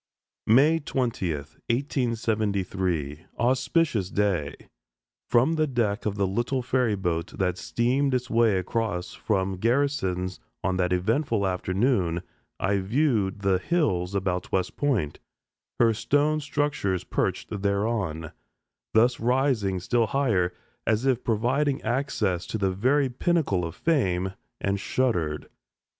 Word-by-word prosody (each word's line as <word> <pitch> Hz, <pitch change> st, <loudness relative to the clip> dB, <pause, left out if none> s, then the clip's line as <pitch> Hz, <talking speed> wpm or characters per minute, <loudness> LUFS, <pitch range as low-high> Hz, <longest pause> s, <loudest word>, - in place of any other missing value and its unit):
May 145 Hz, +9 st, +5 dB
20th, 95 Hz, -, -3 dB
1873! 100 Hz, -, -1 dB
Auspicious 125 Hz, -, +1 dB
day! 90 Hz, -9 st, 0 dB, 0.7 s
From 125 Hz, +7 st, +4 dB
the 155 Hz, -1 st, +1 dB
deck 115 Hz, -5 st, 0 dB
of 100 Hz, -, -1 dB
the 100 Hz, -1 st, +1 dB
little 120 Hz, +7 st, -1 dB
ferry 125 Hz, -3 st, +1 dB
boat 90 Hz, -2 st, -2 dB
that 90 Hz, -1 st, 0 dB
steamed 130 Hz, +3 st, +1 dB
its 125 Hz, 0 st, -1 dB
way 115 Hz, -4 st, +3 dB
across 95 Hz, -1 st, -2 dB
from 95 Hz, -3 st, -1 dB
Garrison's 95 Hz, -6 st, 0 dB, 0.2 s
on 95 Hz, 0 st, 0 dB
that 90 Hz, -1 st, +1 dB
eventful 110 Hz, -, +1 dB
afternoon 90 Hz, -1 st, 0 dB, 0.4 s
I 100 Hz, 0 st, +1 dB
viewed 105 Hz, -2 st, +1 dB
the 95 Hz, -2 st, +2 dB
hills 95 Hz, -, 0 dB
about 90 Hz, -2 st, -1 dB
West 95 Hz, -1 st, 0 dB
Point, 120 Hz, -, 0 dB, 0.6 s
her 115 Hz, -1 st, +5 dB
stone 145 Hz, +7 st, +1 dB
structures 140 Hz, -, -1 dB
perched 105 Hz, -3 st, -2 dB
thereon, 100 Hz, -6 st, -1 dB, 0.6 s
thus 120 Hz, +3 st, +4 dB
rising 120 Hz, -6 st, +1 dB
still 115 Hz, +5 st, +1 dB
higher, 110 Hz, -11 st, +1 dB, 0.4 s
as 110 Hz, +3 st, +2 dB
if 130 Hz, -3 st, +1 dB
providing 130 Hz, +5 st, +1 dB
access 110 Hz, -7 st, -1 dB
to -, -, -3 dB
the 95 Hz, -2 st, +1 dB
very 130 Hz, +9 st, +2 dB
pinnacle 130 Hz, -, 0 dB
of 85 Hz, 0 st, -4 dB
fame, 95 Hz, -, +1 dB, 0.3 s
and 100 Hz, 0 st, -1 dB
shuddered. 90 Hz, -11 st, -1 dB
110 Hz, 120 wpm, -26 LUFS, 95-130 Hz, 0.7 s, May